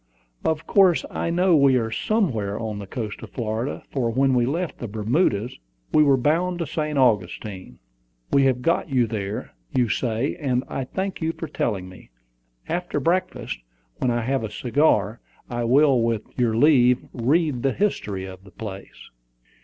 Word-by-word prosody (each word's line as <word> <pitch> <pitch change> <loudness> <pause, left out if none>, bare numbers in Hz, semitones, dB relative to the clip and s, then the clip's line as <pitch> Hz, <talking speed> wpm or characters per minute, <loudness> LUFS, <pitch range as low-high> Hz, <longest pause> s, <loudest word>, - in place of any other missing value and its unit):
Of 160 -1 0
course 190 -4 +4
I - - -2
know 175 +1 +3
we 140 -3 +5
are 115 -3 0
somewhere 115 - 0
on 110 -2 -4
the 100 - -7
coast 105 0 -5
of - - -9
Florida, 115 +2 -3
for 125 -4 0
when 135 +3 +2
we 120 -1 +2
left 170 +5 -2
the 120 - -4
Bermudas 110 - 0 0.3
we 155 - +6
were 140 -3 +5
bound 170 +7 +1
to 170 - -2
St. 150 0 -2
Augustine. 105 -5 0 0.5
We 140 -1 +4
have 125 -2 +1
got 165 +3 +1
there, 110 -6 -1 0.2
you 125 -3 +2
say; 115 +4 -1
and 130 -6 0
I 135 - -3
thank 190 +7 -4
you 160 0 0
for 165 - -6
telling 100 -10 -2
me. 95 0 -14 0.6
After 175 +1 -2
breakfast, 175 - -1 0.4
when 130 - +1
I 120 0 +1
have 130 +1 -1
a 110 - -3
cigar, 120 -1 +1 0.3
I 120 0 -1
will, 135 +1 +4
with 115 -2 0
your 115 -3 +1
leave, 125 -3 +4
read 140 +2 +1
the 135 +1 +1
history 105 - -1
of 95 0 -10
the 100 - -14
place." 100 -1 -9
125 Hz, 170 wpm, -23 LUFS, 110-155 Hz, 0.6 s, we